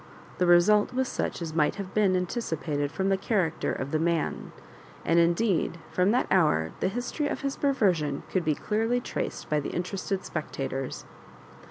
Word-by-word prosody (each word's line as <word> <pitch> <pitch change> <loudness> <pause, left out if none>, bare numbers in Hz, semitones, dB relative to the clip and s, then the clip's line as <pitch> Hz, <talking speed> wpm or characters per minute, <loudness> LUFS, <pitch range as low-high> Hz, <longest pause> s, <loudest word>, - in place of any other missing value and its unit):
The 180 - +3
result 205 +7 +5
was 260 0 +1
such 175 - -3
as 160 -2 -5
might 155 -2 +2
have 195 -2 -6
been 200 -3 +3
anticipated 160 - -2
from 190 0 -1
the 195 - +3
character 190 -6 0
of 135 +2 -4
the 155 - +1
man; 165 0 -1 0.5
and 165 +1 +4
indeed 170 +1 +2
from 180 +2 +2
that 245 +4 +2
hour 150 - +3
the - - +1
history 245 +8 -2
of - - -3
his 275 0 -2
perver 265 -9 +3
sion 150 -4 -3
could 185 - +1
be 155 -2 +1
clearly 225 +7 0
traced - - -4
by 150 - +1
the 145 - -4
interested 190 +2 -3
spectatore. 135 -3 -4
180 Hz, 175 wpm, -27 LUFS, 155-210 Hz, 0.5 s, result